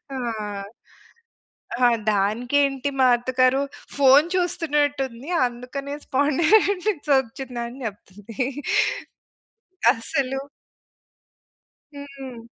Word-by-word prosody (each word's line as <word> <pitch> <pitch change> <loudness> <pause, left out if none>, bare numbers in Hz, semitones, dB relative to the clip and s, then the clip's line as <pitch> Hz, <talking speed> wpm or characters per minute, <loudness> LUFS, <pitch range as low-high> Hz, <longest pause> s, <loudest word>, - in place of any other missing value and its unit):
ఆ! - - -3 1.7
ఆహ్, 240 -1 +5
దానికేంటి 250 +7 +1
మా 260 - +6
అత్తగారు, 255 +2 +2 0.4
"ఫోన్ 280 +2 +6
చూస్తున్నట్టుంది 290 -6 -1 0.2
అందుకనే 255 +4 -7
స్పాండిలైటిసొచ్చిందని" 280 - +1
చెప్తుంది. 210 +2 -6 1.5
అసలు 270 +2 -2 1.5
హ్మ్. 275 -4 -9
270 Hz, 55 wpm, -23 LUFS, 240-285 Hz, 1.7 s, మా